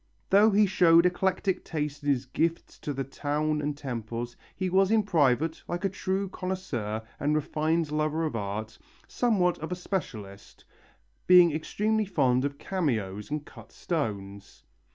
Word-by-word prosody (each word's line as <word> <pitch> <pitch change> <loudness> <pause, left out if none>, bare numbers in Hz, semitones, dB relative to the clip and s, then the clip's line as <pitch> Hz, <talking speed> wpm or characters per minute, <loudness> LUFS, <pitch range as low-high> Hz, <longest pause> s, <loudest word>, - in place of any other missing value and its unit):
Though 205 +3 +7
he 210 0 +4
showed 170 -3 +5
eclectic 185 +1 0
taste 150 -3 -4
in 145 - -2
his 135 -2 +1
gifts 165 +6 -2
to 150 - -4
the 135 -1 -2
town 150 +3 -1
and 145 0 -2
temples, 120 -3 -5 0.2
he 185 - -2
was 190 +1 +3
in 220 -1 +3
private, 160 -3 +2
like 175 +3 -3
a - - +2
true 190 +1 -2
connoisseur 145 - -4 0.2
and 150 +1 +1
refined 155 +1 0
lover 155 +1 0
of 150 - -3
art, 110 +1 -4 0.3
somewhat 195 -8 +1
of 160 +3 -6
a - - 0
specialist, 110 - -6 0.6
being 180 -2 +8
extremely 215 +8 0
fond 130 -8 +2
of 140 0 -3
cameos 110 - -2
and 150 0 -3
cut - - -14
stones. 100 - -4
155 Hz, 155 wpm, -28 LUFS, 130-185 Hz, 0.6 s, being